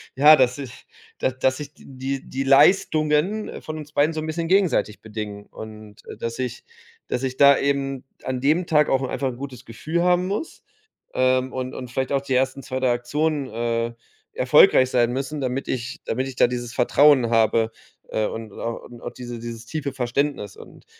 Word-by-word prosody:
ja, 150 +3 +8
dass 125 0 +2
ich 135 -4 -9 0.3
da 130 - +1
dass 130 +2 0
ich 150 0 -8
die - - -19
die 135 +1 -4
die 135 +1 -2
Leistungen, 155 +6 +3
äh, - - -8
von 155 0 -6
uns 150 0 -9
beiden 155 +2 +2
so 155 - -3
'n - - -5
bisschen 165 +1 -2
gegenseitig 185 - +2
bedingen 105 -2 -7
und, 110 -1 -11
äh, - - -8
dass 115 +1 -5
ich 125 -2 -4 0.5
dass 125 - -2
ich 130 -1 -2
da 140 0 +7
eben 135 -1 -1 0.2
an 130 -1 -2
dem 155 +7 +1
Tag 150 -2 +4
auch 135 0 +2
'n 130 - -3
einfach 135 - -2
'n 125 -2 -4
gutes 130 -2 -8
Gefühl 155 +9 -3
haben 180 0 +3
muss, 205 - -4 0.5
ähm, 130 0 +2
und 130 0 -4
und 125 -2 -7
vielleicht 130 +2 -2
auch 135 - +2
die 135 -2 -2
ersten 135 +1 0
2, 130 -2 -4
3 130 -1 +2
Aktionen, 145 +4 -1
äh, 115 0 -2 0.4
erfolgreich 395 - +5
sein 120 -1 +2
müssen, 140 +3 -3
damit 130 +1 -2
ich 125 -1 -4
damit 130 +4 -2
ich 135 - -8
da - - +5
dieses 120 -1 -3
Vertrauen 130 -1 +4
habe, 115 0 +3 0.4
äh, 110 - 0
und 110 -1 -7
oder 115 0 -5
und 120 -1 -13
auch - - -6
diese 120 -1 -8
dieses 115 0 -7
tiefe 145 +1 -4
Verständnis 125 -4 -2
und - - -15
130 Hz, 200 wpm, -23 LUFS, 120-150 Hz, 0.5 s, ja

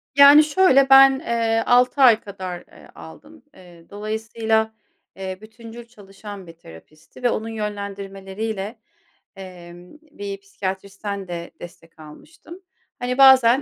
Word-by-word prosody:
Yani, 285 +2 +8
şöyle. 285 -4 +3
Ben, 270 0 +7
eee, 230 -4 -1
6 250 +3 +2
ay 235 -4 +6
kadar, 185 -3 -8
eee, - - -18
aldım. 295 - -15
Eee, 175 -2 -18
dolayısıyla, 220 +1 -3 0.4
eee, 190 -1 -7
bütüncül 230 +1 -13
çalışan 205 -3 -13
bir 165 - -12
terapistti 155 - -17
ve 245 - +3
onun 225 -1 -4
yönlendirmeleriyle, 200 0 -6 0.6
emm, 180 -2 -13 0.2
bir 200 -1 -7
psikiyatristten 195 0 -7
de 170 -1 -7
destek 165 -2 -14
almıştım. 320 - -15 0.4
Hani 250 +1 -3
bazen 265 -1 +6
215 Hz, 120 wpm, -21 LUFS, 190-245 Hz, 0.6 s, Yani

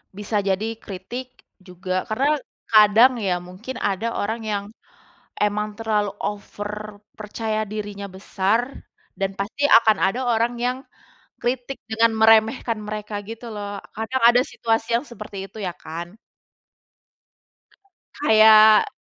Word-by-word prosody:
Bisa 210 +1 -2
jadi 205 +3 -2
kritik 240 +7 -8 0.2
juga, 185 0 -4
karena 280 +7 +1 0.3
kadang 215 +3 +7
ya, 190 -4 0
mungkin 185 +9 -8
ada 205 +3 -1
orang 220 +3 -2
yang 200 -1 -1 0.8
emang 210 0 0
terlalu 210 -2 0
over, 205 0 -6 0.2
percaya 215 +1 -3
dirinya 205 -1 -6
besar 195 +3 0 0.6
dan 195 -1 0
pasti 205 +8 -4 0.2
akan 220 -2 +3
ada 195 +7 +1
orang 235 +1 +1
yang 250 +1 0 0.7
kritik 250 +2 -2
dengan 225 +1 +3
meremehkan 220 +1 +4
mereka 210 0 -6 0.2
gitu 230 +1 -8
loh. 205 -1 -6
Kadang 225 +5 -2
ada 245 +1 +4
situasi 225 -1 -1
yang 240 +5 -1
seperti 210 -3 -9
itu - - -14
ya 180 -3 -3
kan? 170 +4 -8 2.0
Kayak 220 -4 +6
215 Hz, 120 wpm, -22 LUFS, 200-225 Hz, 2.0 s, kadang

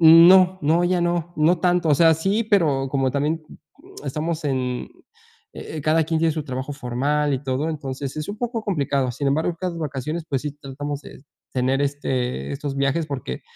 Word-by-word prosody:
N 165 +1 +9
no, 185 0 +6
no, 160 +4 +3
ya 180 0 +2
no, 175 -1 -1
no 160 +3 +3
tanto. 180 -2 +2
O 150 - +5
sea, 165 +2 +6
sí, 195 +8 0
pero 155 -11 +2
como 135 -2 +1
también, 150 +4 0 0.4
mm, 390 +6 -13
estamos 160 +1 -3
en 130 -3 -2 0.7
eh, 155 - -6
cada 155 +2 +3
quien 160 0 0
tiene 165 0 +2
su 155 -1 -3
trabajo 130 +1 -4
formal 145 +3 0
y 130 - -4
todo, 135 +4 -1
entonces, 140 -2 -5
es 150 - -4
un 205 - -4
poco 235 -1 -2
complicado. 140 - 0
Sin 140 +2 -1
embargo, 160 +4 0
cada 180 -2 -3
vacaciones, 155 +2 -4
pues, 135 -2 -1
sí 150 - -3
tratamos 145 +1 -5
de 140 - -13 0.3
tener, 130 +2 +1
este 130 - -2
estos 140 0 -4
viajes, 140 +4 +1
porque, 130 - -5
150 Hz, 190 wpm, -23 LUFS, 135-170 Hz, 0.7 s, N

